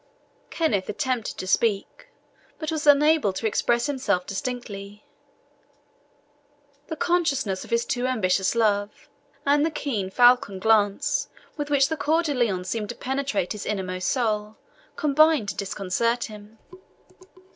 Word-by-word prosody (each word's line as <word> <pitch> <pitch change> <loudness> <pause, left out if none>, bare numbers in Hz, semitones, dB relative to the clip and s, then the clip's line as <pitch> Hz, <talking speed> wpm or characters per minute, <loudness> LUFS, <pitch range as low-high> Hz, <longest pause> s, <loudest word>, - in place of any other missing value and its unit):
Kenneth 215 - 0
attempted 245 +1 -2
to - - -5
speak, 205 - 0 0.5
but 310 0 -4
was 310 -1 -3
unable 295 -5 +5
to 225 - -5
express 235 +2 +1
himself 255 -11 -1
distinctly; 210 -3 -6 1.8
the 320 - -4
consciousness 285 - 0
of - - -13
his 235 0 +1
too 250 0 -1
ambitious 195 -5 +1
love, 210 -2 0 0.4
and 290 +1 +3
the 320 - +2
keen, 240 -11 -3
falcon 245 -2 +4
glance 220 +8 +1 0.3
with 295 -1 -4
which 275 -2 +4
Coeur 320 +1 +1
de 300 -3 -1
Lion 220 -8 0
seemed 210 +3 -3
to 240 - -5
penetrate 265 -8 -2
his 210 - -5
inmost 185 -3 -3
soul, 215 -4 -1 0.4
combining 305 -3 +3
to 200 - -4
disconcert 205 +4 -1
him. 210 0 -10
235 Hz, 130 wpm, -24 LUFS, 205-285 Hz, 1.8 s, unable